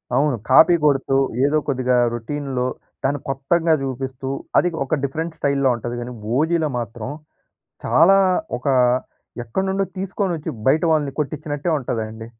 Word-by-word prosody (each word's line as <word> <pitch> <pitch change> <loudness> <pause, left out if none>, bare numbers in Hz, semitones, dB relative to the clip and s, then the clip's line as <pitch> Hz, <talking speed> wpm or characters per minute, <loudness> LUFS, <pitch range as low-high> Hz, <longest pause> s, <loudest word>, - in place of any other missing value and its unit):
అవును. 145 -2 +2
కాపీ 160 +6 +7
కొడుతూ 135 -2 +2 0.3
ఏదో 150 +2 +2
కొద్దిగా 130 -2 +1 0.2
రొటీన్‌లో 130 +1 -3 0.4
దాన్ని 140 +2 0
కొత్తంగా 160 +5 +1
చూపిస్తూ 130 0 -4 0.3
అది 180 - +4 0.2
ఒక 145 - 0
డిఫరెంట్ 160 +4 -3
స్టైల్‌లో 140 -1 +2
ఉంటది. 120 +1 -5
కానీ 120 +1 -6 0.2
ఓజీలో 160 0 +1
మాత్రం 115 +1 -6 0.8
చాలా 190 +5 +5 0.4
ఒక 130 - -11 0.8
ఎక్కడినుండో 190 +10 -1
తీసుకొచ్చి, 185 -4 -2 0.2
బయట 155 +5 +3
వాళ్ళని 145 -3 0
కొట్టించినట్టే 150 +2 -3
ఉంటదండి. 110 -3 -4
140 Hz, 120 wpm, -21 LUFS, 130-160 Hz, 0.8 s, కాపీ